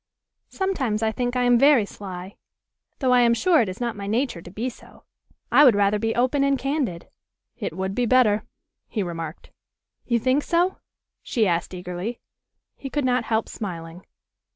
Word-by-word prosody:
"Sometimes 265 - -1
I 220 - +2
think 245 +3 -2
I 250 - +2
am 245 -1 +4
very 275 -5 +5
sly, 190 -1 -8 0.6
though 260 -3 +1
I 250 - +6
am 235 -1 +4
sure 340 +2 +4
it 215 - -1
is 185 - -7
not 235 -2 -2
my 200 -1 -6
nature 225 -4 -1
to 175 - -11
be 215 +7 -4
so. 255 - -11 0.5
I 295 - +7
would 250 -7 +7
rather 205 +1 +2
be 225 +1 -1
open 255 +3 +2
and 275 0 +2
candid." 270 - -2 0.5
"It 160 - -5
would 190 +1 -2
be 245 +3 0
better," 225 -4 +4 0.5
he 210 - -2
remarked. 165 -3 -7 0.6
"You 235 - +2
think 255 +5 +2
so?" 350 +4 +1 0.4
she 230 -4 0
asked 175 0 -1
eagerly. 180 +6 -5 0.6
He 270 - -7
could 290 0 -1
not 250 -2 +1
help 220 -1 0
smiling. 170 -3 -7
230 Hz, 175 wpm, -24 LUFS, 195-255 Hz, 0.6 s, I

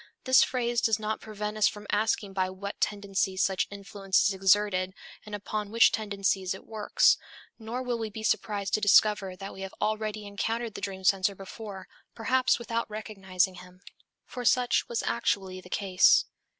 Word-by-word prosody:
This 260 0 +6
phrase 240 -2 0
does 225 -2 +2
not 215 0 -3
prevent 210 0 -5
us 215 - +5
from 210 0 -5
asking 210 -1 0
by 185 -1 0
what 200 +2 -7
tendencies 195 -2 0
such 190 -1 0
influence 200 -1 0
is 200 - 0
exerted 190 -1 +2 0.3
and 210 - -5
upon 205 0 -4
which 230 +2 +5
tendencies 195 -3 -1
it - - -13
works; 215 -2 +3 0.4
nor 230 +3 -4
will 245 -2 -2
we 220 -1 -3
be 220 +1 -8
surprised 205 -2 -1
to 215 - +2
discover 205 -2 +4
that 195 +1 -8
we 190 - -10
have 195 0 -7
already 215 0 -2
encountered 225 +3 -3
the - - -7
dream 190 -1 -5
censor 195 +1 +2
before, 195 0 -9 0.3
perhaps 255 +3 +2
without 230 -1 -3
recognizing 195 -4 -1
him. 180 +1 -16 0.4
For 250 - -7
such 245 0 +2
was 235 - -1
actually 190 -5 -1
the 180 - -15
case. 190 -1 +4
205 Hz, 170 wpm, -28 LUFS, 195-220 Hz, 0.4 s, This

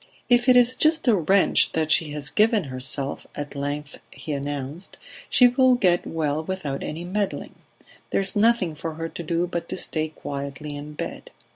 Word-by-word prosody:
"If 245 +1 +4
it 250 - +7
is 245 0 +6
just 310 +2 +2
a 235 - +6
wrench 190 +2 +3
that 160 -1 0
she 160 -2 +3
has 150 -1 -2
given 215 -1 +3
herself," 135 +1 -2
at 145 0 -5
length 145 +1 -4
he 155 - -8
announced, 145 +4 -5 0.3
"she 250 - +6
will 255 +1 +4
get 180 -7 +2
well 155 -1 -1
without 160 -6 -4
any 160 +3 -5
meddling; 195 +3 -3 0.6
there - - +1
is 195 +3 -1
nothing 210 -5 +3
for 160 +1 -6
her 165 +1 -4
to - - -7
do 170 +1 0
but 170 -1 -5
to - - -3
stay 155 -1 -2
quietly 140 0 -6
in 145 +1 -8
bed. - - -6
165 Hz, 180 wpm, -24 LUFS, 145-205 Hz, 0.6 s, it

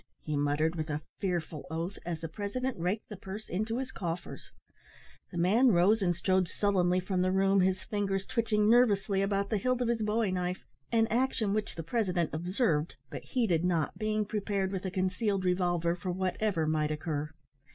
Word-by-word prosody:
"Nothin'!" 155 - -2
he - - +1
muttered 145 +3 +1
with 160 -1 -3
a 150 0 -2 0.2
fearful 170 -5 -3
oath, 165 +5 -4
as 165 -2 -3
the 165 - -3
president 210 +10 -3
raked 185 +6 -1
the 210 - -6
purse 195 +3 -8
into 215 +5 -2
his 265 0 -3
coffers. 175 -1 -5 0.8
The 175 - -6
man 205 +10 +4
rose 195 +6 +4
and 175 -2 +2
strode 185 +1 +2
sullenly 185 -3 +2
from 185 0 -1
the 185 0 +2
room, 195 0 +3
his 185 0 +1
fingers 195 -2 -1
twitching 215 -2 +1
nervously 205 -4 +4
about 200 0 0
the 215 - +2
hilt 255 +4 +1
of 245 -2 0
his 235 -2 0
bowie 215 -1 +1
knife; 180 0 -2 0.3
an 225 -1 +4
action 235 -4 +1
which 215 -1 -2
the 165 - -5
president 180 -3 0
observed, 170 - 0 0.2
but - - -5
heeded 195 -10 +1
not, 170 -4 0
being 215 -1 0
prepared 200 -2 -1
with 190 -1 -4
a - - 0
concealed 190 +2 0
revolver 175 -2 +1
for 180 +1 -5
whatever 185 -1 0
might 155 -1 +1
occur. 150 -1 -2
190 Hz, 185 wpm, -30 LUFS, 175-210 Hz, 0.8 s, man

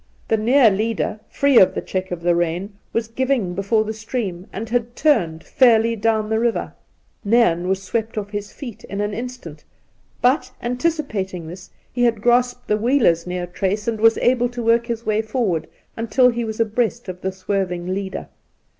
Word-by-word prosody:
The 220 - +3
near 235 +1 +5
leader, 215 +1 -1
free 280 -3 +4
of 185 - +5
the - - -1
check 185 0 -3
of 175 -1 -5
the 175 0 +3
rein, 175 +4 -1 0.2
was 230 -1 -1
giving 240 -5 0
before 200 +4 +1
the 220 0 -4
stream, 215 -5 -4
and 220 +4 -5
had 240 +1 -1
turned 175 - +1
fairly 230 -2 +4
down 220 0 +1
the 220 +1 0
river. 235 0 -1 0.5
Nairn 200 -6 +3
was 190 +1 -1
swept 225 +3 -2
oflF 205 -1 -4
his 205 0 -5
feet 245 -7 -9
in 200 - -6
an 205 0 -1
instant, 230 -10 -7 0.6
but, 260 +5 +2
anticipating 240 - -2
this, 180 +3 -10 0.2
he 245 - -2
had 235 -3 +3
grasped 245 +2 +1
the 210 - +2
wheeler's 215 -8 +2
near 180 0 -3
trace, 195 +5 -2
and 220 -2 -1
was 225 0 +5
able 245 0 +2
to 245 -1 -5
work 230 +1 +3
his 235 -1 -4
way 215 0 +1
forward 215 -7 -1 0.3
until 230 +3 +3
he 235 -1 -2
was 220 -1 -5
abreast 230 +1 0
of 180 0 -7
the 190 - -1
swerving 185 -2 -2
leader. 195 0 -4
220 Hz, 180 wpm, -21 LUFS, 190-235 Hz, 0.6 s, near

